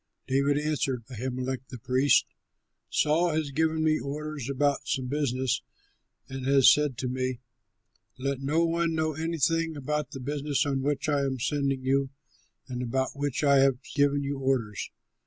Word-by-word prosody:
David 140 +2 +2
answered 145 -5 -1
Ahimelech 130 +2 -4
the 130 - -8
priest, 130 +3 +3 0.6
"Saul 160 +3 +2
has 155 -3 -1
given 160 +2 +1
me 155 0 +3
orders 145 -1 -5
about 140 +1 +1
some 130 -2 -1
business 130 -2 0 0.7
and 135 0 -6
has 135 -1 +7
said 150 -4 +1
to 125 - -2
me, 130 -1 -2 0.8
'Let 135 +1 -2
no 155 +5 +2
one 165 0 0
know 155 0 0
anything 165 0 0
about 150 0 -2
the 140 -2 -7
business 145 +2 -1
on 135 -2 0
which 145 +2 -1
I 145 -2 +2
am 135 -1 -2
sending 140 0 0
you 135 +1 +1 0.6
and 125 -1 -4
about 130 +2 -1
which 145 0 -2
I 140 -1 +5
have 135 -1 +4 0.2
given 145 0 +2
you 140 0 -3
orders.' 125 -7 -1
140 Hz, 155 wpm, -28 LUFS, 130-150 Hz, 0.8 s, has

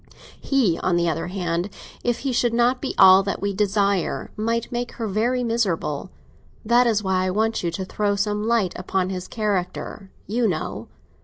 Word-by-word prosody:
He, 240 -12 +1
on 185 - +1
the 170 0 +2
other 165 +1 -1
hand, 175 0 -2 0.3
if 240 -1 0
he 270 - -1
should 240 -1 +1
not 245 +2 +2
be 270 - -3
all 190 0 +8
that 200 0 -3
we 200 0 -1
desire, 200 -2 0
might 230 +2 -1
make 240 0 -3
her 230 - -4
very 235 +5 0
miserable. 195 -8 -1 0.6
That 240 +2 +4
is 215 -2 +1
why 185 -1 +1
I - - 0
want 220 +4 0
you 170 - +1
to 190 +3 -4
throw 205 +1 0
some 210 +1 -1
light 225 -6 +2
upon 185 0 -1
his 185 -1 -5
character, 195 -2 -3 0.2
you 230 +2 +1
know. 115 - -3
205 Hz, 180 wpm, -23 LUFS, 185-230 Hz, 0.6 s, all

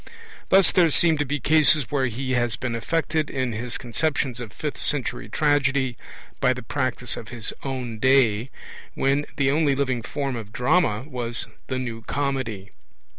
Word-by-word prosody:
Thus 195 0 +6
there 175 -3 +4
seem 160 0 +3
to 145 - +1
be 145 +2 -1
cases 150 -2 +4
where 135 -3 +1
he 130 +3 -4
has 120 -3 +1
been 125 -2 -3
affected 155 +5 -1
in 130 -3 -1
his 115 +2 -2
conceptions 130 0 -1
of 120 -3 -7
fifth 150 +4 -5
century 130 -7 -2
tragedy 140 -2 +1 0.4
by 130 -1 +3
the 125 - -7
practice 130 -1 -2
of 115 - -8
his 115 -3 -5
own 125 -5 -4
day, 130 -2 +3 0.5
when 140 +2 +1
the 135 -1 +3
only 145 -2 +2
living 130 -3 0
form 135 +2 -3
of 110 -3 -7
drama 125 -3 +2
was 120 -4 -3 0.2
the 130 - -2
New 120 -3 -4
Comedy. 115 -8 -3
130 Hz, 165 wpm, -24 LUFS, 120-145 Hz, 0.5 s, Thus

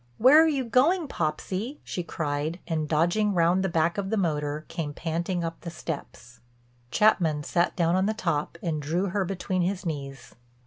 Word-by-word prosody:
"Where 285 +7 +7
are - - +3
you 275 -5 0
going, 300 +8 +3
Popsy?" 185 - -3
she 180 - -4
cried 155 0 -3
and, 155 -3 -2
dodging 175 +6 +2
round 175 +2 +3
the 190 - 0
back 170 +3 +1
of 195 -1 -3
the 220 - 0
motor, 150 -4 -1
came 145 -3 -4
panting 170 +2 -2
up 165 0 -5
the 170 - -6
steps. 140 -6 -7 0.5
Chapman 160 - +3
sat 175 +3 +1
down 170 -1 +2
on 190 +1 +2
the 220 - 0
top, 165 -5 -2
and 155 -3 -1
drew 170 +7 -1
her 200 +2 0
between 185 0 -2
his 185 +2 -1
knees. 140 -4 -5
170 Hz, 180 wpm, -27 LUFS, 155-195 Hz, 0.5 s, Where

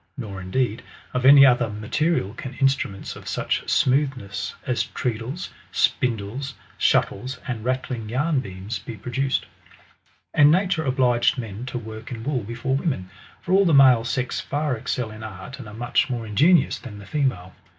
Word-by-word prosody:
Nor, 100 -7 -6
indeed, 110 +4 -1 0.3
of 125 +1 +2
any 140 0 +10
other 120 -3 +4
mate^ 110 +10 -1
rial 100 +3 -3
can 130 +2 -7
instruments 135 -8 0
of - - -12
such - - -2
smoothness 130 -7 0
as 125 -2 0
treadles, 125 +8 -4 0.2
spindles, 125 +4 0 0.2
shuttles, 125 +6 +1
and 120 -4 -3
rattling 125 -3 -2
yarn 145 +5 +1
beams, 95 -2 -6
be 115 +4 -8
produced. 130 +5 -1 0.9
And 145 -1 +6
nature 180 0 +2
obliged 125 -1 +2
men 115 0 -6
to 125 - -4
work 110 0 -8
in 115 -2 -6
wool 135 -1 -1
before 120 +5 -2
women; 130 - -2 0.3
for 180 - -2
all 195 +1 +6
the 165 -4 +4
male 130 -4 +7
sex 125 +1 -2
far 145 -2 -1
excel 115 0 -3
in 110 0 -10
art, 110 +5 -8
and 125 - -8
are - - -9
much 120 +5 +1
more 120 -3 -3
inge 105 +3 -2
nious 170 -1 +4
than 105 -5 -9
the 100 - -11
female. 130 -11 -1
125 Hz, 170 wpm, -24 LUFS, 110-135 Hz, 0.9 s, any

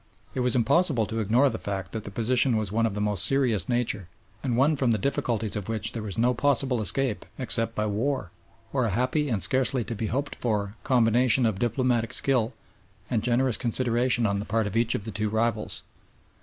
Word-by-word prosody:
It - - -3
was 125 0 +1
impossible 125 0 +3
to 110 +2 -4
ignore 115 +6 +3
the - - -5
fact 95 -3 -4
that 110 -2 -6
the - - -6
position 120 +3 +1
was 105 -3 -2
one 115 +1 +2
of 100 - -5
the - - -3
most 105 -3 +1
serious 130 -7 +1
nature, 115 -6 -1 0.3
and 125 -4 -1
one 145 +4 +3
from 130 -3 +1
the 115 - +3
difficulties 115 -4 -1
of 105 0 -5
which 110 0 -3
there 115 - -5
was 105 -2 -6
no 120 +2 +3
possible 130 -2 +1
escape 110 +3 +1
except 115 -3 0
by 105 - 0
war 110 -1 -2 0.4
or 130 -3 +1
a - - 0
happy 130 +8 0
and 110 -5 0
scarcely 130 -1 +2
to 115 - -5
be 110 0 -3
hoped 140 +6 -2
for 105 -3 -2
combination 125 0 +3
of 110 -4 0
diplomatic 120 -1 0
skill 125 -4 +1 0.6
and 115 -3 +1
generous 125 +1 +1
consideration 120 0 +1
on 100 -1 0
the 105 - -4
part 110 +1 0
of 100 - -5
each 115 0 +2
of 100 - -4
the 110 - -4
two 110 0 -2
rivals. 110 0 -1
115 Hz, 210 wpm, -26 LUFS, 110-130 Hz, 0.6 s, impossible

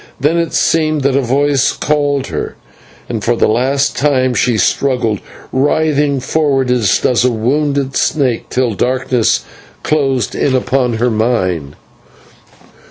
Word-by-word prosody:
Then 150 +5 +1
it 170 -1 -1
seemed 155 -3 +1
that 135 -1 +1
a 140 - +3
voice 135 +2 +1
called 145 -2 0
her, - - -5 0.5
and 110 -3 -4
for 120 - +1
the - - +2
last 130 +5 +1
time 130 -3 +1
she 120 -1 +1
struggled, 115 +1 0 0.3
writhing 145 0 +1
forward 135 -2 0
as 115 -6 +2
does 125 -1 +1
a 125 - +3
wounded 135 +4 -1
snake, 130 -6 0
till 125 -3 0
darkness 125 +1 0 0.4
closed 135 -7 0
in 130 - 0
upon 125 -1 0
her 120 +2 0
mind. 95 - -1
130 Hz, 135 wpm, -14 LUFS, 120-145 Hz, 0.5 s, a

